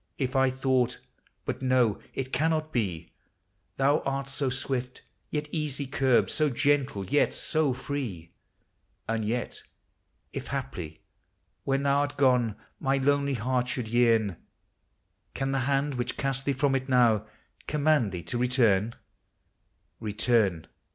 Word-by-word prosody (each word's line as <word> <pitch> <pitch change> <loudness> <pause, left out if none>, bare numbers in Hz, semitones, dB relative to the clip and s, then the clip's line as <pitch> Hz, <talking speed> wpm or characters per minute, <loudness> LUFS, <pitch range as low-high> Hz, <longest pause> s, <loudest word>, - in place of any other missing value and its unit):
If 130 -1 -2
I 135 0 +4
thought 130 -1 +1 0.2
— - - -39
but - - -3
no, 130 -5 +2 0.2
it 130 -1 -4
cannot 155 +3 0
be, 90 -8 -2 0.3
— - - -46
Thou 140 +3 +3
art 135 0 -2
so 135 0 0
swift, 125 -1 -3 0.3
yet 150 0 -2
easy 150 -3 -2
curbed; 130 -2 +2
so 155 -1 +2
gentle, 135 -6 +1
yet 145 +10 +2
so 155 -4 +1
free: 125 - -5 0.8
And 115 -1 -1
yet, 120 +3 -2 0.7
if - - -5
haply, 80 -3 -5 0.6
when 135 0 +1
thou 140 0 +3
'rt 145 - -5
gone, 125 -6 +3 0.2
my 135 0 +1
lonely 140 0 +2
heart 125 +2 0
should 125 -3 -3
vearn, 115 -6 +3 0.5
— - - -47
Can 135 0 -1
the 135 - +1
hand 140 +1 +1
which 125 -1 -3
casts 135 -1 0
thee 140 - 0
from 135 +1 +1
it 135 0 -1
now 115 -4 +4 0.4
com 150 -1 -2
mand 150 -9 +3
thee 90 -2 -5
to 90 +8 -3
return? 115 -4 +2 1.0
Return! 105 -5 +1
130 Hz, 145 wpm, -28 LUFS, 115-140 Hz, 1.0 s, I